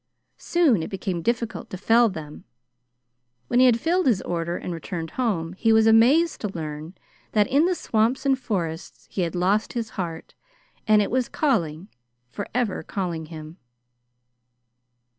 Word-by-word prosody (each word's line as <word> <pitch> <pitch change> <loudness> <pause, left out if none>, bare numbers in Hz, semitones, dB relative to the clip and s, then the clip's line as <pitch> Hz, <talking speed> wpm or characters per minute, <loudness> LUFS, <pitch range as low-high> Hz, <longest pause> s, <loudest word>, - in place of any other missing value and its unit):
Soon 310 - +2
it - - -5
became 185 -2 -3
difficult 235 +3 -2
to 185 - -6
fell 230 +4 +4
them. 155 -5 -9 1.1
When 245 - +3
he 255 - +7
had 235 -2 +3
filled 350 +5 +1
his 225 -7 +3
order 170 0 -2
and 180 - -5
returned 165 0 -5
home, 185 -10 -1
he 225 +4 +1
was 220 0 +5
amazed 250 +10 +4
to 210 - -1
learn 155 -1 -6 0.4
that 210 -1 +4
in 285 +9 +3
the 365 0 +1
swamps 230 0 0
and 270 -1 +2
forests 170 -9 -4
he 190 - -2
had 170 -1 -2
lost 195 +5 +1
his 230 -2 -3
heart 170 -4 -6 0.5
and 215 -1 +5
it - - -4
was 255 0 0
calling 180 - 0 0.4
forever 215 0 -2
calling 170 -2 -4
him. 155 +1 -10
205 Hz, 155 wpm, -24 LUFS, 170-240 Hz, 1.1 s, he